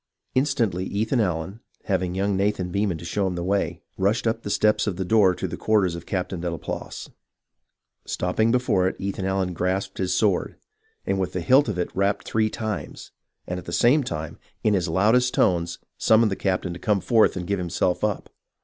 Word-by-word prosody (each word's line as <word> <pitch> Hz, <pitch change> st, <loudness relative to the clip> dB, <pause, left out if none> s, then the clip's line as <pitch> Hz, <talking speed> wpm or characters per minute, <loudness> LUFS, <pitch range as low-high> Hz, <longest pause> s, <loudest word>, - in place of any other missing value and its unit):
Instantly, 120 Hz, -9 st, +1 dB
Ethan 110 Hz, +6 st, 0 dB
Allen, 95 Hz, 0 st, -1 dB, 0.2 s
having 95 Hz, -2 st, -1 dB
young 100 Hz, +1 st, 0 dB
Nathan 95 Hz, -2 st, 0 dB
Beman 100 Hz, -3 st, 0 dB
show 90 Hz, +5 st, -2 dB
him 90 Hz, -, -2 dB
the 85 Hz, -, -3 dB
way, 90 Hz, -3 st, -1 dB, 0.2 s
rushed 100 Hz, +5 st, +1 dB
up 115 Hz, 0 st, 0 dB
the 100 Hz, -, -6 dB
steps 105 Hz, +1 st, +2 dB
to 105 Hz, -, 0 dB
the 95 Hz, +1 st, -4 dB
door 100 Hz, -2 st, +4 dB
of -, -, -4 dB
the -, -, -5 dB
quarters 105 Hz, -5 st, +2 dB
of 85 Hz, 0 st, -8 dB
Captain 90 Hz, -2 st, -3 dB
Delaplace. 85 Hz, -1 st, -5 dB, 1.0 s
Stopping 110 Hz, +5 st, 0 dB
before 125 Hz, -7 st, +2 dB
it -, -, -2 dB
Ethan 95 Hz, -1 st, -3 dB
Allen 95 Hz, -1 st, 0 dB
grasped 95 Hz, +3 st, -2 dB
his 95 Hz, -1 st, 0 dB
sword, 100 Hz, -5 st, +1 dB, 0.5 s
and 95 Hz, -, 0 dB
with 95 Hz, -, -2 dB
the 90 Hz, -, -2 dB
hilt 130 Hz, -, +4 dB
of 100 Hz, -, -2 dB
it 90 Hz, -, -3 dB
rapped 100 Hz, +1 st, 0 dB
three 110 Hz, -1 st, +1 dB
times, 110 Hz, -1 st, -5 dB, 0.3 s
and 90 Hz, 0 st, -4 dB
at 90 Hz, -, -12 dB
the -, -, -6 dB
same 130 Hz, -, +4 dB
time, 80 Hz, -, -5 dB, 0.2 s
in 105 Hz, -, +3 dB
his 90 Hz, -3 st, +1 dB
loudest 110 Hz, +9 st, +3 dB
tones, 85 Hz, -3 st, +1 dB, 0.2 s
summoned 110 Hz, -1 st, +4 dB
the -, -, 0 dB
captain 95 Hz, -2 st, -1 dB
to 85 Hz, -, -8 dB
come 105 Hz, +2 st, +1 dB
forth 110 Hz, -2 st, +3 dB
and 90 Hz, -, -4 dB
give 100 Hz, +1 st, -1 dB
himself 90 Hz, +1 st, -1 dB
up. 105 Hz, -2 st, -1 dB
95 Hz, 195 wpm, -24 LUFS, 90-110 Hz, 1.0 s, door